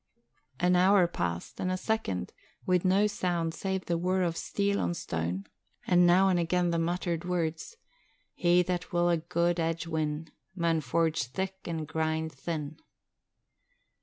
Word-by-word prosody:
An 180 +1 +3
hour 185 +1 +5
passed, 85 - -4
and 185 - -1
a 185 - 0
second, 185 - -2 0.3
with 180 -1 +2
no 195 +2 +4
sound 175 -5 -1
save 190 0 -3
the 170 -1 0
whir 185 +1 +1
of 170 -2 0
steel 200 +2 -1
on 175 - -1
stone 85 - -3 0.4
and 180 -1 +5
now 185 +2 +5
and 180 -2 +3
again 175 +1 +1
the 170 - +1
muttered 170 0 -1
words: 175 - -2 0.6
'He 175 0 +3
that 180 0 -3
will 175 0 +2
a 170 - +3
guid 170 +1 0
edge 165 0 -1
win, 155 -1 -2 0.2
Maun 165 -3 +1
forge 160 +1 +1
thick 190 +9 -4
an' 165 -2 -3
grind 160 0 -1
thin.' 150 +1 -5
170 Hz, 155 wpm, -29 LUFS, 160-180 Hz, 0.6 s, hour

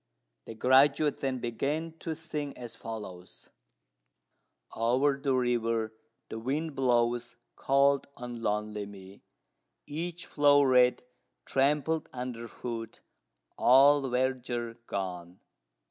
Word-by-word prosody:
The 115 - -7
graduate 140 +5 +4
then 135 -1 -1
began 140 +7 -2
to 160 -2 -4
sing 150 -3 -5
as 120 -2 -8
follows: 105 -6 -9 1.2
"Over 130 +5 +2
the 135 -2 +1
river 115 -3 0 0.4
the 110 - -5
wind 145 +7 -2
blows 120 -2 +1 0.2
cold 140 0 +2
on 120 -1 -7
lonely 105 -1 -2
me: 100 -1 -13 0.6
Each 170 +3 -5
flow'ret 140 -4 +4 0.4
trampled 150 +3 +1
under 125 -2 -5
foot, 115 -2 -7 0.6
all 140 +3 +6
verdure 125 -2 -2
gone. 90 -2 -5
125 Hz, 100 wpm, -29 LUFS, 115-140 Hz, 1.2 s, all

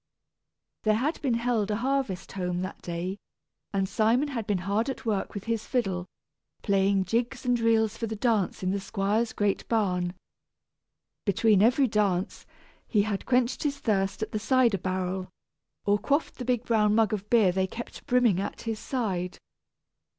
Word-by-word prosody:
There 215 -1 +3
had 280 +9 -1
been 260 -5 +1
held 230 -3 0
a 210 - +1
harvest 245 -6 -1
home 180 -2 -2
that 185 +1 -6
day, 180 +3 -4 0.5
and 195 -1 0
Simon 235 +9 +2
had 230 -6 -4
been 205 - +1
hard 210 +6 +1
at 265 - -5
work 210 -3 -1
with 200 - -4
his 230 -1 -2
fiddle, 190 -8 -1 0.6
playing 195 -1 +2
jigs 240 +6 -1
and 245 -1 +2
reels 225 -1 +2
for 230 - -2
the 220 - -4
dance 215 -5 0
in 185 - +1
the 200 - 0
squire's 210 +4 0
great 205 -1 -1
barn. 180 -5 0 1.1
Between 205 -1 +3
every 250 +5 +5
dance, 200 -4 0 0.4
he 210 -3 +3
had 205 -2 -3
quenched 250 0 +2
his 285 -2 -1
thirst 195 -3 0
at - - -5
the 215 - -1
cider 240 -3 +3
barrel, 185 0 -2 0.6
or 205 0 +3
quaffed 285 +7 0
the 250 - -4
big 245 -1 0
brown 210 -2 +3
mug 220 -2 +3
of 205 0 -4
beer 220 -6 +5
they 190 +1 0
kept 240 +8 -8
brimming 245 -8 +3
at 200 - -5
his 225 -2 -3
side. 190 -10 -2
215 Hz, 170 wpm, -27 LUFS, 195-235 Hz, 1.1 s, every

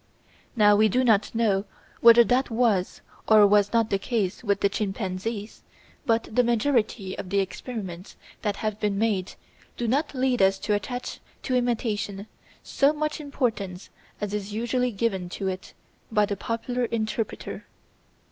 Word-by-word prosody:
Now 210 -2 +6
we 215 +1 +4
do 255 +6 +2
not 220 -3 +2
know 205 -4 +1 0.3
whether 235 0 +8
that 250 +3 +1
was 225 -6 +1 0.3
or 215 -1 +7
was 205 0 +4
not 230 -2 +1
the 195 - +2
case 210 -4 -2
with 200 -3 0
the - - +4
chimpanzees, 200 +1 -4 0.5
but 230 -1 +2
the 250 - +5
majority 230 -5 0
of 185 - -6
the 200 - 0
experiments 195 -2 -4 0.3
that 205 -2 -1
have 215 0 -3
been 205 -2 0
made 200 -4 0 0.4
do 240 - -2
not 285 +5 0
lead 255 -3 +1
us 195 0 +4
to 205 +2 -1
attach 245 +4 -4 0.2
to 255 - -2
imitation 220 -5 -1 0.4
so 280 +1 +2
much 305 0 -2
importance 220 -10 -3 0.3
as 205 -1 -3
is 205 0 -4
usually 240 +3 0
given 195 -4 -2
to 195 +2 -4
it 185 0 -7 0.4
by 210 -1 +3
the 200 - -3
popular 240 +4 -2
interpreter. 220 -1 -4
215 Hz, 155 wpm, -25 LUFS, 200-240 Hz, 0.5 s, whether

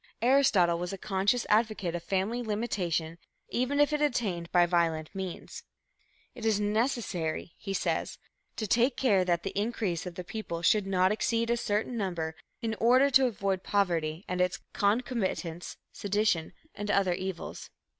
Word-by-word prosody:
Aristotle 225 -10 +4
was 180 0 -3
a 195 - -5
conscious 200 +5 0
advocate 215 -5 +1
of 175 - -3
family 195 +7 -1
limitation 180 -7 -2 0.3
even 255 +4 0
if 290 +1 +4
attained 235 - 0
by 175 -1 +5
violent 165 -2 0
means. 190 -3 -6 0.7
"It 245 -3 -10
is 220 -2 +2
necessary," 205 - -1
he 195 -1 -5
says, - - -1 0.4
"to 220 - -2
take 240 +5 +2
care 205 -8 +3
that 175 -1 0
the 195 - -3
increase 200 -5 -1
of 175 - -7
the 180 - -5
people 170 -4 -5
should 200 +3 +3
not 185 0 +3
exceed 230 +2 0
a - - +3
certain 225 +1 -1
number 175 -6 -2 0.3
in 225 -1 0
order 255 +4 +5
to 265 0 +6
avoid 195 -4 -1
poverty 170 -4 0
and 180 0 -1
its 180 0 0
concomitants, 200 -6 -1
sedition 205 -5 0 0.2
and 205 0 -5
other 195 -3 +3
evils." 185 -1 -5
200 Hz, 155 wpm, -29 LUFS, 175-230 Hz, 0.7 s, to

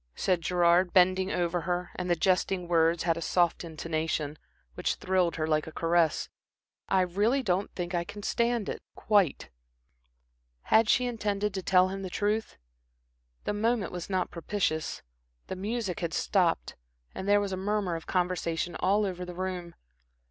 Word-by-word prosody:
said 180 -3 +1
Gerard, 175 +1 +3
bending 185 0 +4
over 175 0 0
her 180 0 -2
and 180 -1 -4
the 175 - +4
jesting 180 +1 +1
words 165 0 +3
had 165 -1 +1
a - - -4
soft 175 +2 +1
intonation, 160 -2 -3 0.3
which - - -1
thrilled 185 -2 +1
her 155 - -1
like 155 -1 0
a - - -6
caress. 165 -1 +1 0.6
"I 190 - +4
really 205 +9 +1
don't 190 -2 0
think 175 0 -4
I 170 -1 +1
can 205 +3 -9
stand 235 -2 0
it - - -4
quite." 195 - +1 1.1
Had 220 0 +4
she 250 - +4
intended 210 -4 -1
to 190 - -3
tell 185 0 +4
him 195 +1 -5
the 190 - -5
truth? 210 +4 -1 0.9
The - - -1
moment 220 -1 0
was 180 0 -6
not 185 -2 -1
propitious. 170 -2 -2 0.4
The - - -5
music 205 0 -3
had 170 -2 -2
stopped, 180 -4 +1 0.4
and 190 - -6
there 205 0 +6
was 200 -1 -2
a - - -1
murmur 195 -2 -1
of 165 - -7
conversation 175 -2 -1
all 205 +3 +2
over 180 -2 -4
the 180 -1 -7
room. 180 -2 -4
180 Hz, 165 wpm, -29 LUFS, 170-200 Hz, 1.1 s, there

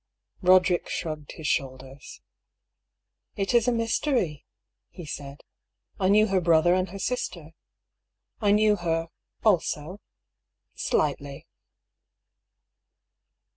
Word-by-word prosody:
Eoderick 185 -1 +4
shrugged 155 -4 -5
his 160 - -10
shoulders. 135 0 -4 1.1
"It 195 +3 -1
is 235 -1 +3
a - - +4
mystery," 230 - -1 0.4
he 175 - -10
said. 140 -1 -8 0.6
"I 190 -1 +2
knew 210 +2 +5
her 195 -3 +1
brother 170 0 +4
and 185 +1 0
her 195 - -8
sister. 180 -7 -4 0.9
I 205 - +2
knew 210 0 +4
her 165 -2 -2 0.2
— - - -43
also 180 -2 0 0.4
— - - -54
slightly." 140 -2 -2
175 Hz, 105 wpm, -26 LUFS, 150-205 Hz, 1.1 s, knew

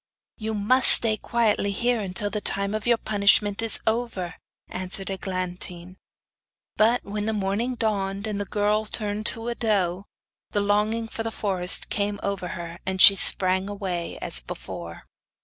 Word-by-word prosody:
'You 220 0 -4
must 245 +6 +3
stay 225 -2 +5
quietly 215 -2 0
here 225 0 -1
till 205 +3 0
the 210 - -3
time 200 +1 0
of 215 +1 -4
your 235 -1 +3
punishment 205 -1 +2
is 225 -1 +2
over,' 220 -6 -2 0.3
answered 185 +1 0
Eglantine. 185 -1 -4 0.8
But 230 +3 +2
when 210 +1 -4
the 220 - -1
morning 210 +5 -2
dawned, 200 -3 -2
and 210 -2 -4
the - - -4
girl 210 +2 -1
turned 210 0 -3
into 225 0 -1
a 240 - -1
doe, 195 -5 -1 0.5
the 205 - +1
longing 210 +3 0
for 225 - -6
the 225 - -3
forest 190 -4 -1
came 205 -1 -1
over 200 -2 -3
her, 170 0 -7
and 190 0 -4
she 195 - +10
sprang 190 0 +5
away 190 -4 -4
as 65 - +3
before. 85 +6 -9
205 Hz, 160 wpm, -24 LUFS, 190-220 Hz, 0.8 s, she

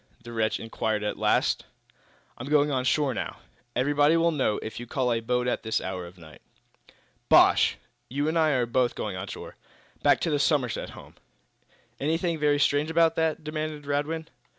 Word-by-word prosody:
the 120 -1 -9
wretch 110 -1 0
inquired, 110 -1 -2
at 105 - -2
last. - - +2 0.8
"I'm 130 - -6
going 150 0 +3
on 130 -2 -1
shore 140 -1 +2
now." - - -4 0.4
"Everybody 145 +4 +3
will 170 0 +3
know, 130 -9 0
if 110 - -6
you 120 - -8
call 125 -1 0
a 115 - 0
boat 125 +2 -1
at - - -1
this 110 0 -1
hour 90 -2 -5
of 90 - -14
the 90 - -18
night." 80 -1 -14 0.9
"Bosh! - - +5 0.3
You 145 +3 -1
and 160 - 0
I 160 -1 +3
are 125 -2 +1
both 120 +1 +1
going 105 -3 -4
on 95 +2 -5
shore - - -9 0.4
back - - +4
to 165 - 0
the 145 - +1
Somerset 140 -6 0
House. - - -13 0.9
Anything 165 +3 0
very 145 -1 +3
strange 145 +2 +2
about 165 0 +3
that?" 160 -1 0
demanded 155 -1 -4
Radwin. 145 +3 -2
140 Hz, 185 wpm, -26 LUFS, 115-155 Hz, 0.9 s, Bosh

